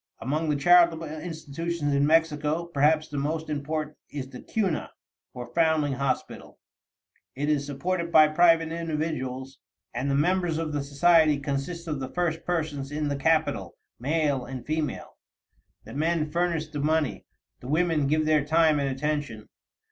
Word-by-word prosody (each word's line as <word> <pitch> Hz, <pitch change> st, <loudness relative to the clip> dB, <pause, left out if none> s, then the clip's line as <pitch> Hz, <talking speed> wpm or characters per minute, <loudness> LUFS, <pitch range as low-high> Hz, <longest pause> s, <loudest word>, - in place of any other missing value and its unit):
Among 155 Hz, +4 st, -1 dB
the 150 Hz, -, +2 dB
charitable 170 Hz, +2 st, +5 dB
institutions 155 Hz, -1 st, -4 dB
in 140 Hz, +1 st, +3 dB
Mexico, 160 Hz, 0 st, +2 dB
perhaps 155 Hz, -1 st, +2 dB
the 145 Hz, -2 st, -4 dB
most 155 Hz, +2 st, -2 dB
important 150 Hz, +1 st, -3 dB
is 140 Hz, -3 st, -5 dB
the 125 Hz, -1 st, -10 dB
Cuna, 195 Hz, -8 st, -1 dB, 0.4 s
or 120 Hz, -1 st, -9 dB
Foundling 160 Hz, -4 st, +2 dB
Hospital. 135 Hz, +1 st, -3 dB, 0.8 s
It 145 Hz, +3 st, -2 dB
is 145 Hz, -2 st, 0 dB
supported 170 Hz, +4 st, -2 dB
by 155 Hz, -2 st, +7 dB
private 165 Hz, 0 st, +4 dB
individuals, 150 Hz, -5 st, -4 dB, 0.3 s
and 125 Hz, +4 st, -2 dB
the 140 Hz, -, +1 dB
members 175 Hz, +2 st, +1 dB
of 160 Hz, -2 st, -3 dB
the 145 Hz, -1 st, -1 dB
society 155 Hz, +2 st, +4 dB
consist 145 Hz, +5 st, -4 dB
of 150 Hz, -3 st, -2 dB
the 130 Hz, -1 st, -5 dB
first 170 Hz, -1 st, -2 dB
persons 155 Hz, -5 st, -2 dB
in 150 Hz, 0 st, -2 dB
the 140 Hz, -, -1 dB
capital, 160 Hz, +3 st, 0 dB, 0.2 s
male 145 Hz, 0 st, 0 dB
and 125 Hz, -1 st, -7 dB
female. 155 Hz, 0 st, -3 dB, 0.7 s
The -, -, -11 dB
men 155 Hz, +1 st, 0 dB
furnish 170 Hz, -2 st, 0 dB
the 150 Hz, -1 st, -5 dB
money; 155 Hz, -1 st, 0 dB, 0.3 s
the 125 Hz, -, -10 dB
women 155 Hz, -1 st, +1 dB
give 155 Hz, +2 st, +1 dB
their 155 Hz, -2 st, +3 dB
time 155 Hz, 0 st, +3 dB
and 140 Hz, -1 st, 0 dB
attention. 135 Hz, -5 st, -3 dB
155 Hz, 155 wpm, -26 LUFS, 140-165 Hz, 0.8 s, by